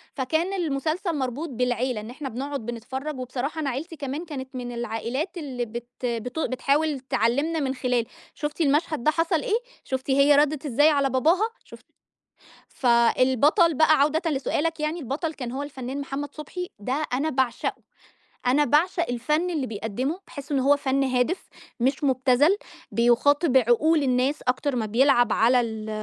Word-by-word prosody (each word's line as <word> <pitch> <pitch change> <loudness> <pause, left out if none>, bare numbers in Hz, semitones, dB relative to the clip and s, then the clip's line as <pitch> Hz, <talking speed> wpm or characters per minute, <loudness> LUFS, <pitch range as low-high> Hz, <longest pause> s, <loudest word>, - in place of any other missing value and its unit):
فكان 315 +8 0
المسلسل 330 +1 -1
مربوط 275 +4 -3
بالعيلة. 250 -2 -1
إن 215 - -9
إحنا 270 +3 -6
بنقعد 270 +1 -5
بنتفرّج 260 +5 -5
وبصراحة 255 +5 -3
أنا 280 - -1
عيلتي 305 +7 -5
كمان 290 +3 -5
كانت 265 -4 -7
من 245 -1 -5
العائلات 240 - -3
اللي 260 -6 -4
بت 235 +1 -7 0.2
بتو 245 +6 -2
بتحاول 285 +3 0
تعلّمنا 265 +6 0
من 270 -3 -1
خلال، 250 -2 0 0.3
شُفتِ 295 +2 -4
المشهد 300 -2 +1
ده 310 - +4
حصل 330 +1 +1
إيه؟ 455 -3 +1 0.3
شُفتِ 260 +1 -4
هي 280 +2 +5
ردّت 295 0 +2
إزاي 290 +3 +4
على 280 -3 +2
باباها؟ 330 - +2
شُفتِ - - -15 0.8
فالبطل 260 - +3
بقى 310 0 +4
عودةً 315 +3 +2
لسؤالك 305 +3 -1
يعني، 305 +3 -2
البطل 285 +4 -3
كان 250 -4 -6
هو 270 +2 -3
الفنان 275 -1 -5
محمد 280 +1 -5
صُبحي 360 +4 -6
ده 255 +9 -2
أنا 280 +5 0
باعشقه. 260 -4 -1 0.6
أنا 275 +4 +4
باعشق 335 +5 +2
الفَن 300 +9 0
اللي 300 -6 -1
بيقدّمه، 245 - -3
باحس 280 0 -8
إن 280 - +2
هو 275 +2 +4
فَن 275 -1 0
هادف 255 +7 0 0.3
مش 270 +4 +1
مٌبتزَل، 265 +6 +3 0.4
بيُخَاطب 265 +5 +3
عقول 265 +6 +4
الناس 260 +2 +1
أكتر 255 +2 0
ما 220 -3 -1
بيلعب 240 0 +3
على 245 +2 +4
ال 220 -2 -4
275 Hz, 155 wpm, -25 LUFS, 250-305 Hz, 0.8 s, هي